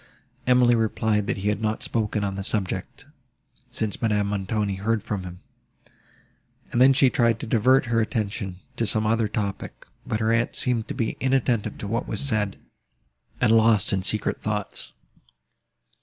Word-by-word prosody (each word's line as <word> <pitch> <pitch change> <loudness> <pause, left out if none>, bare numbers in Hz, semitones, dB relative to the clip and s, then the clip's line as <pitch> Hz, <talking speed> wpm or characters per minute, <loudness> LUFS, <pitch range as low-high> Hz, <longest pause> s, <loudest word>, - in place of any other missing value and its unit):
Emily 125 -1 +5
replied 110 -2 +1
that 120 - -1
he 100 +2 -1
had 105 +1 -1
not 110 0 -1
spoken 105 -2 -1
on 100 -1 -1
the 100 0 -4
subject 95 -2 -3 0.7
since 110 -4 -2
Madame 105 -3 +1
Montoni 100 0 -1
heard 110 +1 -1
him; 90 -4 -5 1.3
and 120 - +1
then 130 +1 +8
she 130 -1 +4
tried 115 -2 +2
to - - -5
divert 125 +4 +3
her 115 -1 +1
attention 105 -4 -3 0.2
to 115 - +1
some 110 +1 +2
other 110 0 +2
topic; 100 -1 -4 0.2
but 110 - -1
her 110 0 +1
aunt 115 +1 +1
seemed 120 -3 +1
to - - -5
be 115 -4 -2
inattentive 130 -4 0
to 105 - -6
what 115 +4 -2
she - - -2
said, 110 -7 0 0.8
and - - +3
lost 110 -3 +3
in 95 - +1
secret 105 +3 -1
thoughts. 105 -2 -4
110 Hz, 160 wpm, -24 LUFS, 105-115 Hz, 1.3 s, then